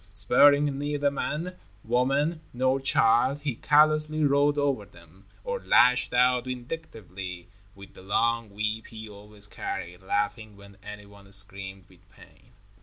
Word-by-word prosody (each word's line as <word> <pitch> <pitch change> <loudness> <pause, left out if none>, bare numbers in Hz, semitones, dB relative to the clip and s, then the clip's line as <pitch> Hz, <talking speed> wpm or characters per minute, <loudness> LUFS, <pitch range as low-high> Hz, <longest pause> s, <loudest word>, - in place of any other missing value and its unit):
Sparing 140 +7 +4
neither 145 0 -1
man, 165 +6 -4 0.3
woman, 135 +7 0
nor 130 +2 0
child, 130 +1 +2
he 145 -4 -2
callously 155 +3 +2
rode 145 +1 +2
over 140 -6 0
them, 85 0 -20 0.2
or 485 -1 -4
lashed 125 - +3
out 125 0 +2
vindictively 110 - -8 0.3
with 100 -1 -14
the - - -15
long 115 +3 -1
whip 105 +2 -4
he 110 -1 -10
always 105 0 -7
carried, 90 -2 -7
laughing 105 +2 -3
when 100 0 -16
anyone 100 -1 -13
screamed 95 -1 +1
with 95 -2 -24
pain. - - -21
115 Hz, 130 wpm, -26 LUFS, 100-140 Hz, 0.3 s, Sparing